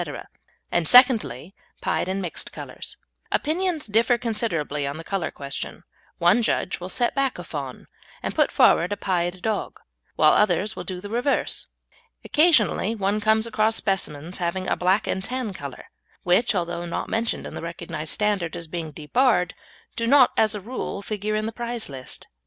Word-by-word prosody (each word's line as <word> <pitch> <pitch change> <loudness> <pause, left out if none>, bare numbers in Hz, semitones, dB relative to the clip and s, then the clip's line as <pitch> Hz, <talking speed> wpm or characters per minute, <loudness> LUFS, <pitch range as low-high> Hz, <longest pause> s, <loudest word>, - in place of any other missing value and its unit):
and, 165 - +1
secondly, 225 - +5 0.3
pied - - -1
and 190 +1 -2
mixed 175 - -4
colours. - - -8 0.3
Opinions 330 +1 0
differ 225 +3 +3
considerably 180 - -1
on 140 +2 -4
the 165 - -7
colour 195 -1 -2
question; 140 -1 -6 0.3
one 175 +7 +4
judge 220 - 0
will 180 +1 -6
set 240 +5 +1
back 275 -2 0
a 175 - -6
fawn 140 -6 -6 0.4
and - - -2
put - - +3
forward 175 +4 +4
a 205 - -1
pied 175 -1 -1
dog, 220 -1 -2 0.4
whilst - - +6
others 210 +1 +2
will - - -5
do 185 -2 -5
the 205 - -7
reverse. 245 +5 0 0.6
Occasionally 295 - +3
one 205 0 0
comes 220 +1 +3
across 220 -1 +2
specimens 175 -4 -2
having 185 +2 -2
a - - +2
black 185 +4 +2
and 190 - -2
tan 250 -2 -2
colour, 140 -7 -8 0.4
which, 195 +6 +3
although 175 -1 -2
not 170 - -3
mentioned 225 +1 -1
in - - -7
the - - -6
recognised 170 -2 -4
standard 205 -6 0
as 170 - -5
being 165 -1 -4
debarred, 180 - +1 0.4
do 230 - -1
not 265 0 +6
as 215 -1 +3
a 205 - -5
rule 210 -2 -5
figure 215 0 -2
in 215 0 -1
the 225 - -2
prize 235 -2 -4
list. 130 -2 -8
200 Hz, 170 wpm, -24 LUFS, 170-230 Hz, 0.6 s, whilst